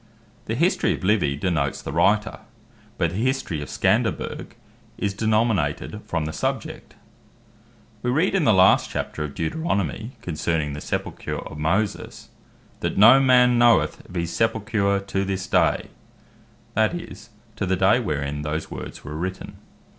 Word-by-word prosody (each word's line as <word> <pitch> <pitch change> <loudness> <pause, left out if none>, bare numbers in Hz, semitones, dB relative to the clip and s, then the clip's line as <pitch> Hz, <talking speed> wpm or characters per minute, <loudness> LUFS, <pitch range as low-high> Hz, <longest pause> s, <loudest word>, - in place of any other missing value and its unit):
The 110 - -2
History 170 +8 +2
Of - - -11
Livy, 95 -8 +2
denotes 75 -3 -1
the - - -6
Writer; 105 +7 +2 0.6
but 85 -3 +1
the 90 - -5
History 115 - -1
Of 70 - -7
Scanderbeg, - - -1 0.4
is 100 -1 -1
denominated 110 -4 0
from 85 -3 -1
the 80 - -4
subject. - - -4 1.1
We 125 - -1
read 160 +10 +2
in 195 -4 +2
the 115 - +5
last 95 -1 +5
Chapter 75 - -4
of 70 -2 -6
Deuteronomie, 100 - -1
Ver. 110 - -7
6. - - -26
concerning 80 -3 -1
the 75 - -6
sepulcher - - -4
of 75 - -8
Moses, 95 +7 -2 0.5
"that - - -2
no 115 +7 +8
man 125 -2 +5
knoweth 120 -1 +3
of 90 - -12
his 85 -1 -2
sepulcher 110 -3 +1
to 100 0 -2
this 95 -1 -3
day," - - +1 0.8
that 110 +10 +2
is, 110 - -9 0.3
to 100 - -2
the 95 - +2
day 95 +6 +4
wherein 75 - -3
those 75 +1 -4
words - - -8
were 75 - -7
written. 95 +4 -5
100 Hz, 155 wpm, -23 LUFS, 80-115 Hz, 1.1 s, no